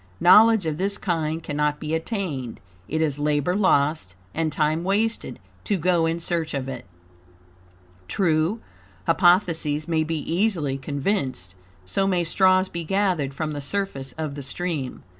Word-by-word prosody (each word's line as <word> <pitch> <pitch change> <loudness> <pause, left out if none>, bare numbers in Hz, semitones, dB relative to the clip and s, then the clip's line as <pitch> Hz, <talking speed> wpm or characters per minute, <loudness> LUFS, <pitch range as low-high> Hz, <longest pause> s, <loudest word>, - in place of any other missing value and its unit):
KNOWLEDGE 215 +2 +6
OF 155 -2 -2
THIS 200 +2 -1
KIND 160 -3 -2
CANNOT 150 0 -1
BE 155 0 -4
ATTAINED; 160 - -3 0.3
it 160 +1 0
is 145 -2 -1
labor 150 +3 +1
lost 150 - +1 0.2
and 160 -1 -1
TIME 155 +2 0
wasted 200 - 0 0.3
to 205 - +1
go 175 -1 +2
in 165 +1 -1
search 165 -2 -2
of 135 -1 -3
it. 130 -2 -7 1.2
True, 165 - +1 0.4
hypotheses 165 -5 +2
may 160 -2 +1
be 160 +1 -2
easily 165 -4 0
conceived; 135 - -2 0.3
so 195 - 0
may 180 -3 +1
straws 185 +2 +3
be 170 -2 -5
gathered 175 -7 0
from 155 +1 -2
the 145 -1 -4
surface 140 -4 -3
of 155 -3 -4
the 145 - -6
stream. 140 -1 -4
160 Hz, 145 wpm, -24 LUFS, 145-185 Hz, 1.2 s, KNOWLEDGE